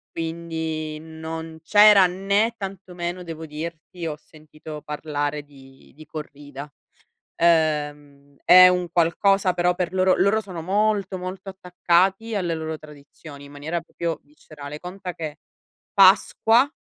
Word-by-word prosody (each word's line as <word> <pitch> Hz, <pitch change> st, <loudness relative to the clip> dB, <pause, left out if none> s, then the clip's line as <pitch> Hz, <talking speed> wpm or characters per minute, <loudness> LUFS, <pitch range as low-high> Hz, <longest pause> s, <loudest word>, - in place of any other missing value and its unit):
Quindi 160 Hz, -2 st, -4 dB
non 160 Hz, 0 st, -8 dB
c'era 205 Hz, +1 st, +7 dB
né 200 Hz, +5 st, 0 dB
tantomeno 185 Hz, -3 st, -6 dB
devo 165 Hz, -1 st, -7 dB
dirti 165 Hz, +3 st, -7 dB
ho 155 Hz, -2 st, -4 dB
sentito 155 Hz, 0 st, -12 dB
parlare 150 Hz, -1 st, -3 dB
di 135 Hz, -2 st, -18 dB
di 155 Hz, -, -13 dB
corrida. 145 Hz, -2 st, -9 dB, 0.7 s
Ehm, 145 Hz, -4 st, 0 dB
è 185 Hz, +1 st, +9 dB
un 180 Hz, -1 st, 0 dB
qualcosa 185 Hz, +3 st, +2 dB
però 180 Hz, 0 st, +1 dB
per 180 Hz, 0 st, -3 dB
loro, 185 Hz, 0 st, +3 dB
loro 200 Hz, +4 st, +2 dB
sono 185 Hz, -5 st, -8 dB
molto, 200 Hz, +1 st, 0 dB
molto 185 Hz, +2 st, -7 dB
attaccati 190 Hz, +3 st, 0 dB
alle 180 Hz, -4 st, -1 dB
loro 160 Hz, 0 st, -4 dB
tradizioni 145 Hz, -1 st, -13 dB
in 140 Hz, -, -14 dB
maniera 155 Hz, +4 st, -4 dB
proprio 170 Hz, 0 st, -5 dB
viscerale 150 Hz, 0 st, -11 dB
conta 180 Hz, 0 st, -7 dB
che 155 Hz, -3 st, -6 dB, 0.6 s
Pasqua 225 Hz, +6 st, +5 dB
165 Hz, 125 wpm, -23 LUFS, 150-185 Hz, 0.7 s, è